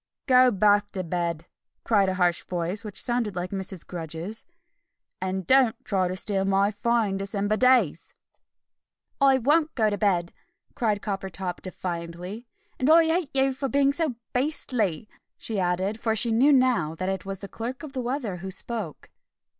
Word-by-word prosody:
"Go 255 -1 +6
back 205 -1 +3
to 185 - -2
bed!" 170 -1 -2 0.4
cried 200 -4 +3
a 185 - -1
harsh 175 -2 +1
voice, 180 +4 -2
which 210 -3 -5
sounded 240 -5 0
like 180 0 -3
Mrs. 190 -3 -5
Grudge's, 170 +4 -6 0.8
"and 185 0 -2
don't 260 -1 +4
try 190 -3 +1
to 180 - -3
steal 195 0 0
my 195 +1 +2
fine 215 -1 0
December 200 +1 -1
days!" 245 - +3 1.1
"I 270 -1 +6
won't 300 +5 +2
go 220 -3 +2
to 205 - -2
bed!" 180 -5 +1 0.4
cried 215 -4 -1
Coppertop 190 -2 -4
defiantly, 180 +4 -6 0.3
"and 260 - +1
I 325 +1 +7
hate 325 -1 0
you 270 0 +3
for 270 +1 -3
being 280 0 +3
so 310 -4 -1 0.2
beastly!" 245 - -1 0.3
she 220 -3 -3
added, 185 +4 0
for 225 -1 0
she 230 +2 +3
knew 255 +6 +5
now 250 - +3
that 185 +3 -4
it 190 0 -2
was 195 0 -5
the 200 - -8
Clerk 245 +8 -6
of 295 -3 -8
the 260 - -2
Weather 240 -6 -3
who 190 +2 -6
spoke. 195 -3 -5
205 Hz, 165 wpm, -26 LUFS, 185-250 Hz, 1.1 s, I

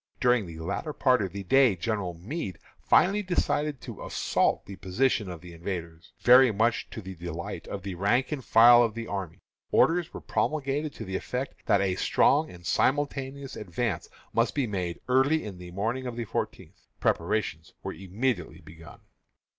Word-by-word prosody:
During 125 -5 +3
the 80 -1 -9
latter 90 - -3
part 130 -4 +3
of 95 -3 -2
the 100 0 -6
day 130 +1 +4
General 95 -1 -2
Meade 95 - -5 0.2
finally 200 +3 +4
decided 150 -6 0
to - - -8
assault - - 0
the 100 - -8
position 105 +3 0
of 85 -2 -7
the 90 -1 -11
invaders. 85 -2 -6
Very 125 +3 +7
much 110 +3 +1
to 110 - -8
the 95 +1 -7
delight 85 -1 -6
of 100 -2 -6
the 100 -1 -4
rank 100 - +1
and 145 -4 -3
file 120 +2 +7
of 115 -2 +1
the 115 0 -4
army, 95 -6 -5 0.3
orders 170 0 +3
were - - -7
promulgated 150 0 -1
to - - -7
the 95 0 -4
effect 125 +7 -4
that 100 - +4
a 95 -2 +1
strong 145 - +3
and 90 -1 -13
simultaneous 135 - 0
advance 105 -1 -3 0.2
must 115 0 +1
be 140 -3 +1
made 90 -6 -3
early 135 +2 +3
on 95 -3 -8
the 90 0 -9
morning 115 +8 -2
of 120 - -5
the 120 -1 -3
fourteenth. - - -5
Preparations 85 -3 -1
were - - -4
immediately 95 -3 -3
begun. 80 +1 -14
110 Hz, 175 wpm, -28 LUFS, 90-130 Hz, 0.3 s, Very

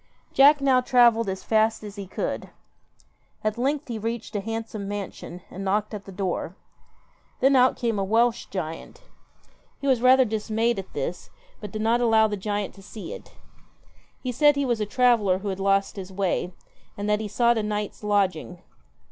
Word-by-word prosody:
Jack 285 +2 +6
now 265 -2 +4
travelled 235 -4 +4
as 190 0 -5
fast 220 0 +1
as 205 -1 -8
he 200 -2 -7
could. - - -4 0.9
At 215 0 0
length 275 +4 -1
he 230 -3 -4
reached 230 0 -4
a 205 - 0
handsome 225 -1 -5
mansion 195 -3 -6
and 195 - -6
knocked 205 +3 0
at 205 -2 -6
the 195 - -10
door. 185 -2 -3 0.8
Then 270 +1 +4
out 255 0 +4
came 230 -4 -1
a - - 0
Welsh 230 +4 +1
giant. 185 - -6 0.8
He - - -7
was 260 -4 +2
rather 260 +1 +6
dismayed 220 +1 -1
at 190 - -9
this, - - -4 0.3
but 210 -3 -8
did 215 +1 -3
not 235 +2 +2
allow 220 -2 +4
the 210 - -3
giant 205 0 -3
to 195 - -15
see 210 - -8
it. - - -12 0.9
He 255 - -2
said 290 +4 +4
he 280 0 0
was 240 -4 0
a 210 - -1
traveller 225 -6 +3
who 200 +1 -5
had 190 0 -4
lost 195 +1 +1
his 190 -1 -7
way, 185 -2 -1 0.5
and 205 0 -3
that 210 0 +2
he 220 - -4
sought 235 +2 +2
a - - 0
night's 210 0 -4
lodging. 190 -4 0
215 Hz, 185 wpm, -25 LUFS, 200-240 Hz, 0.9 s, Jack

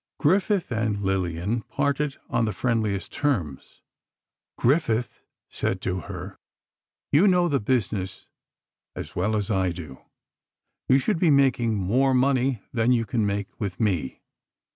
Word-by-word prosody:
Griffith 190 +2 +2
and 110 -3 -1
Lillian 95 +3 -1
parted 140 +3 -1
on 120 -2 +1
the 110 - -2
friendliest 110 -2 -1
terms. 95 - -2 0.7
Griffith 125 -3 +1 0.3
said 95 - -2
to 95 0 -2
her: 95 0 -8 0.7
"You 165 +8 +5
know 180 -2 +4
the 145 -4 +1
business 100 -6 -2 0.7
as - - -7
well 105 +5 0
as 105 +1 -1
I 95 -3 +1
do. 80 -6 -9 0.9
You 130 - +6
should 165 +6 0
be 170 - +4
making 130 -5 +3
more 125 +8 +2
money 130 -3 +2
than 115 0 +2
you 115 -2 +2
can 110 0 0
make 100 0 -4
with 100 -5 -4
me." 90 - -1
115 Hz, 135 wpm, -25 LUFS, 95-135 Hz, 0.9 s, You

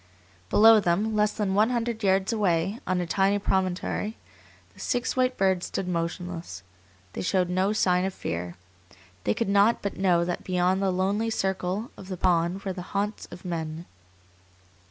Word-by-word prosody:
Below 225 +1 +7
them, 205 +4 0
less 210 0 +3
than 200 -3 -2
one 210 +3 +4
hundred 235 -2 -2
yards 190 +2 +2
away, 195 0 0
on 185 -1 +1
a - - -2
tiny 195 +3 +2
promontory, 190 +2 -1 0.6
the - - -19
six 245 -2 -1
white 255 0 +1
birds 190 -2 +1
stood 185 - -3
motionless. 170 - -4 0.5
They - - -4
showed 180 -1 +1
no 185 +3 +1
sign 180 -4 +2
of 190 - -1
fear. 85 +1 -4 0.7
They 105 - +1
could - - -1
not 200 +3 +3
but 200 - -3
know 175 -3 +3
that 175 0 -3
beyond 185 +1 +1
the 195 - +2
lonely 195 +5 0
circle 190 +1 -2
of 190 - -11
the 185 -1 -5
pond 175 +1 +1
were 190 - -3
the 180 - -6 0.2
haunts 205 +1 -2
of 175 +1 -11
men. 165 -1 -4
190 Hz, 170 wpm, -26 LUFS, 180-205 Hz, 0.7 s, Below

